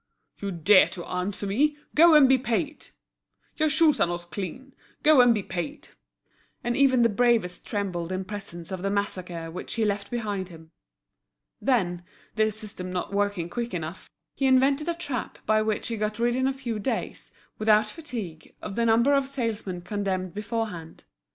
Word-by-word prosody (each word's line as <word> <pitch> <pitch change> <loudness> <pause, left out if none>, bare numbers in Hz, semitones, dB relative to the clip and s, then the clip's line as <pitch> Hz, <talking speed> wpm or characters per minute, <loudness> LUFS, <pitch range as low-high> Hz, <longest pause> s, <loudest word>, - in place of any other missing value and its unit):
"You 200 - -3
dare 185 +2 +5
to 175 - -7
answer 185 +3 -3
me; 290 +10 +1 0.2
go 330 +1 +7
and 290 -3 +8
be 260 0 +4
paid!" 280 +5 -2 0.7
"Your 310 -1 +3
shoes 310 -2 +4
are - - +4
not 175 0 -5
clean; 205 - -6 0.3
go 300 -3 +7
and 245 -1 +6
be 210 -4 0
paid!" 185 - -5 0.7
And 240 0 0
even 260 -3 +4
the - - +6
bravest 230 -5 +1
trembled 185 -5 -3
in 185 0 -3
presence 185 -4 -8
of 185 -1 -4
the 195 - -1
massacre 180 -5 -3
which 180 - -6
he 225 -2 +1
left 200 -1 -2
behind 205 -6 -3
him. 160 -2 -14 0.9
Then, 185 -10 +1 0.3
this 215 0 +1
system 200 -4 -5
not 180 +2 -3
working 200 -4 0
quick 235 +1 -4
enough, 165 +2 -6 0.3
he 270 - +1
invented 275 +4 +3
a 340 - 0
trap 285 -8 -4
by 215 0 +3
which 215 +2 -1
he 230 - -3
got 210 0 -2
rid 240 +1 +1
in 260 +1 +1
a - - +2
few 245 -5 -4
days, 230 +6 -3 0.3
without 215 0 +4
fatigue, 215 - -7
of 195 - -6
the 235 0 +1
number 235 +5 +4
of 275 -1 +2
salesmen 225 -9 -3
condemned 185 -2 -2
beforehand. 210 -6 -4
215 Hz, 175 wpm, -26 LUFS, 185-255 Hz, 0.9 s, and